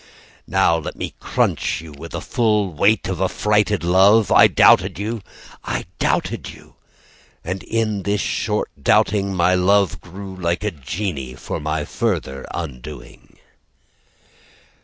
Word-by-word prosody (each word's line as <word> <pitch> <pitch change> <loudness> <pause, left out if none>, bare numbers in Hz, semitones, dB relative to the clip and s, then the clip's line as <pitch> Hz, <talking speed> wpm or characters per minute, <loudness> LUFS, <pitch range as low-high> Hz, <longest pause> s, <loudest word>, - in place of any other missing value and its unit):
Now 85 - +3
let 80 - -6
me - - -5
crunch - - 0
you 80 -1 -10
With 75 +3 -10
full 105 -5 0
weight 100 +9 +2
of 95 -1 -3
affrighted 105 +1 +1
love. 95 +5 +4
I - - +8
doubted 90 -1 +4
you 110 +3 -3 0.4
I - - -3
doubted - - -1
you - - -14 0.7
And 95 +3 -4
in 110 -3 -1
this 100 +2 -1
short - - -1
doubting 100 0 +2
My 90 +1 +3
love 95 -4 +2
grew 95 +3 -9
like 85 +1 -2
a 105 - 0
genie 75 -3 -5
For - - -5
my 75 0 -2
further 65 0 -2
undoing. 75 -2 -8
95 Hz, 130 wpm, -20 LUFS, 80-105 Hz, 0.7 s, I